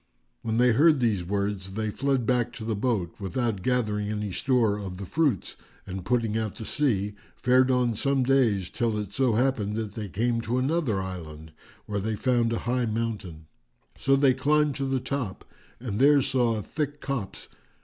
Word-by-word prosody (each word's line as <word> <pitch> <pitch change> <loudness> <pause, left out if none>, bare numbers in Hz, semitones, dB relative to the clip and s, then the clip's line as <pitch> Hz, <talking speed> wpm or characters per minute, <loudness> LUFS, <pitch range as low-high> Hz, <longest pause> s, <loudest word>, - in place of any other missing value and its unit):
When 110 0 -1
they 125 +1 +5
heard 150 +5 +5
these 110 -7 +1
words 100 0 -2
they 110 -1 -1
fled 135 0 0
back 120 0 +1
to 110 - -7
the 110 - -1
boat, 100 -6 -1
without 110 0 -1
gathering 105 -3 0
any 105 -1 -3
store 115 -2 +1
of 95 -3 -6
the 100 - -6
fruits 140 - 0 0.3
and, 95 -1 -6
putting 115 +1 0
out 110 -2 -2
to 110 - -7
sea, 105 -9 0 0.2
fared 130 +1 +3
on 125 -2 +2
some 135 +3 +1
days 120 -8 +2
till 115 -3 0
it 105 -1 -5
so 125 -2 +2
happened 115 -4 +1
that 110 -3 -3
they 105 -2 -5
came 115 +4 0
to 120 +2 -1
another 130 - +1
island, 80 -4 -8 0.3
where 105 -1 -2
they 110 +2 -2
found 120 +1 +1
a 115 - 0
high 125 0 +1
mountain. 105 -8 -4 0.5
So 135 0 +2
they 135 -1 +4
climbed 150 +2 +2
to 140 - -1
the 135 -1 0
top 130 -6 -4 0.3
and 115 -4 -4
there 140 0 +6
saw 120 -3 +1
a 105 - -4
thick 145 +3 -3
copse. 135 -10 -4
115 Hz, 185 wpm, -26 LUFS, 105-130 Hz, 0.5 s, there